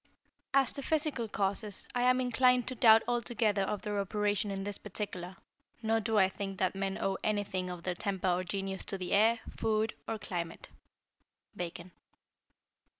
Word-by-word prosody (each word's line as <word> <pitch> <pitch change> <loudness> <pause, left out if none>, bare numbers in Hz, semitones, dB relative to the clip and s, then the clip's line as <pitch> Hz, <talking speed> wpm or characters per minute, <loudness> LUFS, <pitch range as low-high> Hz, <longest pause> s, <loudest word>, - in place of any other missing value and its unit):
As 270 -3 +4
to 280 - -3
Physical 295 -5 0
causes, 200 0 -1
I 245 - 0
am 250 +1 +4
inclined 250 0 +3
to - - -3
doubt 225 -2 +7
altogether 230 -4 +1
of 195 +1 -2
their 205 -1 -1
operation 205 +1 0
in 195 -1 -3
this 205 0 -4
particular; 190 -3 -5 0.5
nor 225 0 +2
do 220 0 0
I 190 -2 +6
think 195 0 -5
that 185 - +1
men 195 0 -2
owe 195 0 -1
anything 195 -3 -1
of 175 -1 -6
their 180 - -1
temper 190 +1 -1
or 180 +1 +1
genius 195 0 -3
to 195 - -3
the 185 -1 -5
air, 225 +3 +4 0.2
food, 220 0 +1
or 225 - -2
climate. 175 -5 -5 0.9
_Bacon. 175 0 -6
205 Hz, 165 wpm, -32 LUFS, 190-225 Hz, 0.9 s, doubt